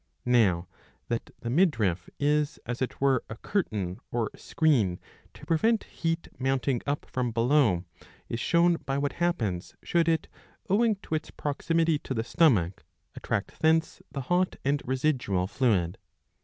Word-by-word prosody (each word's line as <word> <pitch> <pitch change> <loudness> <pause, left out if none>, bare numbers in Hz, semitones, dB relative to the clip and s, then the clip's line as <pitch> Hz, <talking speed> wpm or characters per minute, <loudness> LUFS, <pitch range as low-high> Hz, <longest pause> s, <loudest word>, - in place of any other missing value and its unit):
Now 100 -8 +3 0.4
that 115 -1 -2
the 120 - -3
midriff 110 - +2
is 150 0 +1
as 120 +2 -4
it 130 - -2
were 135 -3 +3
a 115 - -5
curtain 105 - -2
or 115 -3 -1
screen 120 - +1 0.4
to - - -12
prevent 205 +8 +2
heat 165 0 -3
mounting 135 -1 0
up 145 +1 -1
from 125 -1 -2
below, 115 - +3 0.4
is 115 - -3
shown 170 +4 +3
by 135 -3 -3
what 140 0 0
happens, 110 - -1
should 170 -1 +2
it, 160 -1 +1 0.4
owing 220 +2 +3
to - - -6
its 155 - -2
proximity 160 +2 0
to 135 - -5
the 110 - 0
stomach, 110 - +2 0.3
attract - - -3
thence 160 0 +2
the 140 - -4
hot 180 +7 +1
and 140 +1 +2
residual 130 -8 0
fluid. 95 -6 +1
135 Hz, 145 wpm, -28 LUFS, 115-160 Hz, 0.4 s, Now